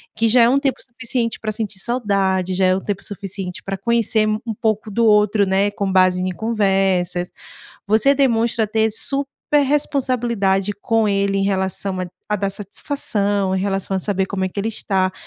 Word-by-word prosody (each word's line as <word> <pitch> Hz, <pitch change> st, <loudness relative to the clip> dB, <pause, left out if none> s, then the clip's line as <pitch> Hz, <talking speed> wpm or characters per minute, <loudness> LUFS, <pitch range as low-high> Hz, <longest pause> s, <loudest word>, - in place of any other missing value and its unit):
que 225 Hz, 0 st, +2 dB
já 245 Hz, +2 st, +6 dB
é -, -, +6 dB
um 270 Hz, +2 st, +3 dB
tempo 275 Hz, -2 st, 0 dB
suficiente 240 Hz, -1 st, -3 dB
pra 215 Hz, -, -2 dB
sentir 210 Hz, -2 st, -4 dB
saudade, 195 Hz, -5 st, 0 dB
já 185 Hz, 0 st, +2 dB
é 185 Hz, -, +4 dB
o -, -, -1 dB
tempo 200 Hz, -1 st, -4 dB
suficiente 195 Hz, -2 st, -6 dB
pra 195 Hz, 0 st, -4 dB
conhecer 225 Hz, 0 st, +1 dB
um 220 Hz, +2 st, -2 dB
pouco 220 Hz, -2 st, 0 dB
do 230 Hz, +3 st, +1 dB
outro, 210 Hz, -1 st, +4 dB
né, 195 Hz, +1 st, +2 dB
com 200 Hz, -1 st, -2 dB
base 185 Hz, -1 st, +3 dB
em 185 Hz, -, -1 dB
conversas. 190 Hz, -4 st, 0 dB, 0.6 s
Você 220 Hz, +7 st, +4 dB
demonstra 230 Hz, -4 st, +2 dB
ter 220 Hz, +1 st, +1 dB
super 280 Hz, +5 st, -1 dB
responsabilidade 240 Hz, -8 st, 0 dB
com 225 Hz, -2 st, +2 dB
ele 200 Hz, 0 st, +1 dB
em 195 Hz, -, +1 dB
relação 190 Hz, -1 st, -1 dB
a 185 Hz, -, -3 dB, 0.2 s
a 210 Hz, -, 0 dB
dar 200 Hz, 0 st, -1 dB
satisfação, 200 Hz, -2 st, -2 dB
em 190 Hz, -, 0 dB
relação 195 Hz, 0 st, -2 dB
a -, -, -1 dB
saber 195 Hz, 0 st, -1 dB
como 190 Hz, -1 st, -2 dB
é -, -, 0 dB
que 185 Hz, -, -9 dB
ele 205 Hz, +3 st, -1 dB
está, 190 Hz, -4 st, -1 dB
205 Hz, 185 wpm, -20 LUFS, 190-230 Hz, 0.6 s, já